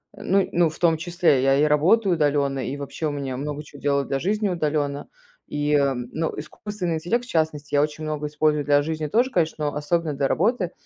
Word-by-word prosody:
Ну 195 -2 +1
ну 170 -1 +3
в 160 - -11
том 165 -2 +3
числе, 170 -5 +2
я 135 +1 +4
и 145 - +3
работаю 175 +7 +3
удалённо, 145 -3 +1
и 130 +2 -3
вообще 145 +3 -4
у 150 - -1
меня 135 -3 -4
много 150 +1 -4
чего 145 -1 -14
делаю 140 -1 +1
для 135 - -2
жизни 205 +5 0
удаленно. 150 -4 -1 0.4
И, 150 0 -1
м, 135 -4 +1
ну 160 0 -2
искусственный 180 +2 -4
интеллект, 180 +10 -1
в - - -16
частности, 155 - -1
я 145 - +4
очень 150 +1 -2
много 150 -1 -3
использую 150 0 +1
для 145 0 +4
жизни 155 +1 -3
тоже, 240 - +2
конечно, 160 -5 0
но - - -10
особенно 155 +1 -1
для 140 0 0
работы. 195 - +1
150 Hz, 210 wpm, -23 LUFS, 145-170 Hz, 0.4 s, я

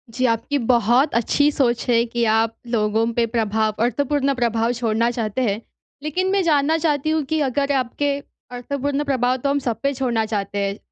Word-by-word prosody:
जी, 255 - +1
आपकी 230 +6 -1
बहुत 245 +4 +3
अच्छी 285 +5 +2
सोच 240 -4 0
है 235 -1 +4
कि 235 0 0
आप 225 0 +2 0.2
लोगों 215 0 +1
पे 235 0 +2
प्रभाव 220 -2 +1
अर्थपूर्ण 280 +3 0
प्रभाव 230 -1 +1
छोड़ना 230 -1 0
चाहते 230 0 -2
हैं। 205 +2 -1 0.4
लेकिन 360 +5 -1
मैं 395 - +2
जानना 310 -1 +2
चाहती 300 -1 +1
हूँ 315 -1 +1
कि 315 - +2
अगर 280 +2 0
आपके 280 +4 -1 0.5
अर्थपूर्ण 280 +3 -2
प्रभाव 255 -2 +1
तो 280 +2 -2
हम 285 +1 +1
सब 240 -4 -3
पे 280 0 +1
छोड़ना 245 -4 0
चाहते 205 -2 -3
हैं, 195 +1 -3
245 Hz, 180 wpm, -21 LUFS, 225-285 Hz, 0.5 s, है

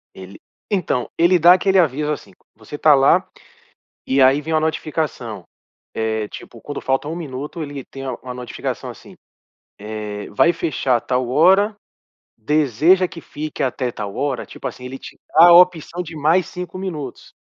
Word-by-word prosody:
Ele 95 +1 -11 0.3
Então, 180 - -1
ele 175 +2 +4
dá 175 +2 +8
aquele 190 +1 +2
aviso 150 -2 +1
assim: 130 -9 -6
C - - -24 0.2
você 110 +7 -9
tá 150 0 +5
lá 135 0 +4 0.8
e 135 +1 +2
aí 135 +3 +5
vem 160 +2 -4
uma 155 - +3
notificação. 150 - -3 0.5
É, 110 -1 -2
tipo, 115 - -11
quando 145 - -6
falta 135 +2 -1
um 160 - -4
minuto, 150 0 -6
ele 145 -2 -7
tem 135 - -10
a 130 - -3
uma 125 +1 -9
notificação 125 -1 -5
assim: - - -13 0.6
Eh, 105 -1 -6
"vai 170 +11 +3
fechar 135 -7 0
tal 125 +1 -1
hora. 190 - +4 0.6
Deseja 155 - +3
que 165 - -10
fique 155 -1 -6
até 130 -1 -1
tal 100 -3 -6
hora?". 140 -3 -2
Tipo - - -9
assim, 125 - -11
ele 130 +1 -7
te - - -12
dá 165 +3 +7
a - - +8
opção 175 -1 +4
de 165 -1 -10
mais 160 +4 +2
5 180 0 -7
minutos. 155 -9 -6
145 Hz, 170 wpm, -20 LUFS, 125-165 Hz, 0.8 s, dá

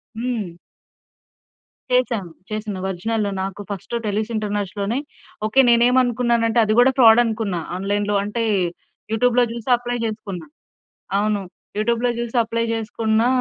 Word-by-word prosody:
హ్మ్. 220 -7 -3 1.4
చేశాను. 235 -8 +1 0.2
చేసిన 215 -2 -4
ఒరిజినల్లో 205 +3 -1
నాకు 195 +1 -5
ఫస్ట్ 200 +3 -7
టెలూస్ 215 +2 -1
ఇంటర్నేష్‌ 205 -3 -2
లోనే 210 +6 0 0.5
ఓకే. 220 +5 +2
నేనేమనుకున్నానంటే 235 -1 +3
అది 215 0 +1
గూడా 255 +2 +6
ఫ్రాడనుకున్నా. 225 -5 +4 0.2
ఆన్‌లైన్‌లో 205 +2 -1
అంటే, 210 +3 -2 0.7
యూటూబ్‌లో 245 +2 +3
జూసి 235 +1 -6
అప్లై 245 0 -3
జేసుకున్నా. 205 -5 -5 0.7
అవును. 210 0 +1 0.4
యూటూబ్‌లో 235 +3 +1
జూసి 235 0 -4
అప్లై 230 +1 -1
జేసుకున్నా. 225 0 0
220 Hz, 110 wpm, -21 LUFS, 205-235 Hz, 1.4 s, గూడా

